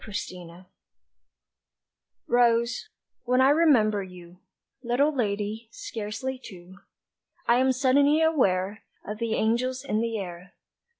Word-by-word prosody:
TO - - -11
ROSE 180 -3 -7 1.6
ROSE, 240 - +2 0.4
when 250 +1 +2
I 265 +2 +6
remember 250 -10 +3
you, 180 -1 -12 0.4
Little 275 +5 +1
lady, 215 -1 -2
scarcely 225 +5 -5
two, 185 -2 -12 0.7
I 235 - +5
am 260 +1 +3
suddenly 280 +3 +3
aware 205 - +1 0.2
Of 210 +1 -6
the 230 -1 -1
angels 255 +4 0
in 220 -5 0
the 230 -1 -2
air. 180 -2 -8
230 Hz, 115 wpm, -26 LUFS, 200-255 Hz, 1.6 s, I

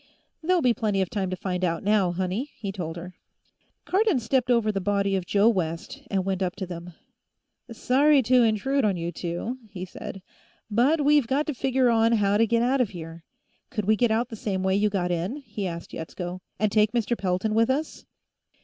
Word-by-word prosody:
"There'll 355 0 +2
be 245 -2 +4
plenty 210 -4 -1
of 180 - -7
time 195 -3 -1
to 185 - -2
find 185 0 -3
out, 170 -2 0
now, 200 -3 +3
honey," 190 +9 -2
he 200 -3 -4
told 170 -4 -5
her. 180 +2 -8 0.7
Cardon 390 - +2
stepped 245 +2 0
over 230 -3 +3
the 195 -2 -2
body 200 0 +1
of 185 -2 -3
Joe 205 +2 +3
West 180 - -1
and 190 -2 0
went 195 -1 -1
up 185 -1 -1
to 190 - -4
them. 175 -1 -8 0.8
"Sorry 275 +4 +3
to 250 +2 +4
intrude 240 +5 +1
on 200 -4 +1
you 170 0 -3
two," 175 +9 -4
he 185 -2 -6
said, 190 +1 -8 0.5
"but 265 +9 +3
we've 295 -4 +4
got 280 +5 +1
to 300 - -2
figure 260 -1 +2
on 225 0 +3
how 205 -2 +3
to 230 +1 +3
get 230 +1 +2
out 260 +2 +2
of 235 - +1
here. 165 -3 -9 0.4
Could 215 -7 -3
we 215 +2 +4
get 240 +2 +2
out 225 +2 0
the 225 - -6
same 195 -3 -2
way 190 0 +2
you 210 +1 +2
got 180 -3 -1
in?" 175 +8 -2
he 235 -9 -5
asked 170 -1 -7
Yetsko. 175 +2 -6 0.2
"And 215 -1 +1
take 215 +1 +3
Mr. 235 0 0
Pelton 190 +1 -1
with 225 +2 +3
us?" 295 +4 -2
210 Hz, 210 wpm, -26 LUFS, 185-245 Hz, 0.8 s, be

